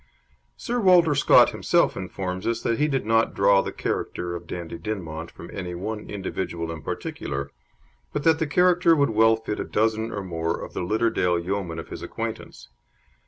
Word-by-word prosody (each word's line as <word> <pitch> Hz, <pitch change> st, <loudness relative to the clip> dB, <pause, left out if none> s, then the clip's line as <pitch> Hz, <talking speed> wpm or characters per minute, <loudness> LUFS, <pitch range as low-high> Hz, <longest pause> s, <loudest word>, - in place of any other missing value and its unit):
Sir 245 Hz, 0 st, -2 dB
Walter 180 Hz, -6 st, +5 dB
Scott 140 Hz, -, +6 dB
himself -, -, +2 dB
informs 95 Hz, 0 st, -4 dB
us 115 Hz, 0 st, -1 dB
that 115 Hz, -, 0 dB
he 150 Hz, -, +3 dB
did 135 Hz, -6 st, -1 dB
not 115 Hz, +1 st, +2 dB
draw 100 Hz, 0 st, +5 dB
the -, -, -4 dB
character 85 Hz, 0 st, -3 dB
of 85 Hz, 0 st, -8 dB
Dandie 85 Hz, -1 st, -6 dB
Dinmont 85 Hz, -5 st, -5 dB
from 85 Hz, -, -11 dB
any 90 Hz, -3 st, -5 dB
one 105 Hz, +4 st, -5 dB
individual 90 Hz, -4 st, -4 dB
in 80 Hz, -2 st, -7 dB
particular, 70 Hz, 0 st, -4 dB, 0.6 s
but 145 Hz, -, -3 dB
that 160 Hz, 0 st, +4 dB
the 160 Hz, -, 0 dB
character 175 Hz, +1 st, +4 dB
would 140 Hz, -5 st, +2 dB
well 110 Hz, +1 st, +5 dB
fit 110 Hz, -1 st, -5 dB
a -, -, -1 dB
dozen 110 Hz, +1 st, 0 dB
or 100 Hz, -2 st, -4 dB
more 80 Hz, -2 st, -2 dB
of -, -, -8 dB
the -, -, -3 dB
Lidderdale 90 Hz, -2 st, +1 dB
yeomen 90 Hz, -1 st, -3 dB
of 80 Hz, -, -7 dB
his -, -, -7 dB
acquaintance. -, -, -6 dB
100 Hz, 180 wpm, -25 LUFS, 85-115 Hz, 0.6 s, Scott